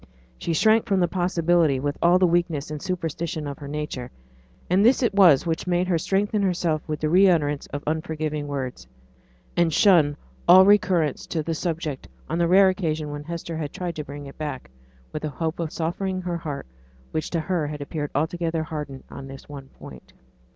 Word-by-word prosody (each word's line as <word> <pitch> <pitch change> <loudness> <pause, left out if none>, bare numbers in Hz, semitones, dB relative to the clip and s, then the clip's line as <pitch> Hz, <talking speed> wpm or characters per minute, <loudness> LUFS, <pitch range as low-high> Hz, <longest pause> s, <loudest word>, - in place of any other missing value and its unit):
She 170 - -2
shrank 220 +7 +3
from 195 -4 +2
such - - +5
a - - -5
possibility 175 -5 +2
with 145 +2 -2
all 175 +1 +5
the 185 - +4
weakness 170 -4 0
and 150 -1 -5
superstition 170 -2 -3
of 140 -1 -6
her 145 - -8
nature; 145 -4 -4 0.6
and 185 +3 +3
this 255 +3 +4
it 235 - +2
was 180 -9 +6
which 165 +1 -2
made 180 0 +1
her 175 -3 +1
strengthen 205 +4 0
herself 175 -5 0
with 155 -1 -3
the 155 - +1
re 185 +5 +6
utterance 145 -4 +1
of 145 - -6
unforgiving 155 -1 -2
words; 130 - -5 0.7
and 170 -1 +3
shun 160 -7 +4 0.3
all 185 +2 +9
recurrence 190 -8 +3
to 160 -2 -2
the 165 - -2
subject 160 -4 -3 0.2
on 165 +2 -2
the 170 - +3
rare 190 +2 +6
occasion 155 -5 -2
when 145 0 -6
Hester 170 0 -5
had 150 -3 -4
tried 175 -2 -4
to 150 - -4
bring 145 0 -8
it 140 - -12
back, 145 - -5 0.4
with 155 - -5
a 155 - -1
hope 160 +4 -3
of 165 -2 -2
softening 185 +3 -2
the 175 -1 -3
heart 150 -4 -5 0.5
which 155 - -2
to 170 - -1
her 165 -1 -1
appeared 145 0 -4
altogether 165 +2 -1
hardened 150 -4 -6
on 135 -1 -8
this 135 0 -11
one 140 -2 -9
point. 65 - -13
160 Hz, 195 wpm, -24 LUFS, 145-175 Hz, 0.7 s, all